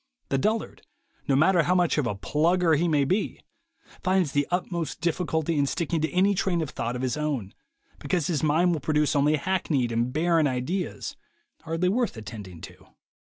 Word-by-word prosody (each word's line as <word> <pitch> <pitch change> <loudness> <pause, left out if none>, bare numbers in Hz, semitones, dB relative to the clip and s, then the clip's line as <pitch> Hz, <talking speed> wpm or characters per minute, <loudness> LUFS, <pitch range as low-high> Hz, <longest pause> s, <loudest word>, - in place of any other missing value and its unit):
The 135 - +1
dullard, 220 +9 -1 0.5
no 140 - +3
matter 170 +5 +4
how 180 +3 +1
much 175 -4 +2
of 135 - 0
a 105 - -2
plugger 160 - +2
he 170 +4 +1
may 150 -4 +2
be, 190 +9 -1 0.6
finds 185 -5 +1
the 145 0 +1
utmost 175 -2 -2
difficulty 165 -2 0
in 140 - +2
sticking 165 +2 -1
to 160 - 0
any 190 +3 +3
train 180 -3 0
of 150 - -6
thought 120 -1 -3
of 125 - -4
his 130 +3 -1
own, 140 -10 -2 0.5
because 150 +2 -1
his 155 -4 0
mind 165 +4 +3
will 160 - -1
produce 150 +1 +1
only 145 +2 +3
hackneyed 150 -6 0
and 120 +2 0
barren 165 +1 +2
ideas, 145 +8 -3 0.5
hardly 165 +3 0
worth 235 - 0
attending 100 -6 -9
to. - - -12
155 Hz, 180 wpm, -26 LUFS, 140-175 Hz, 0.6 s, matter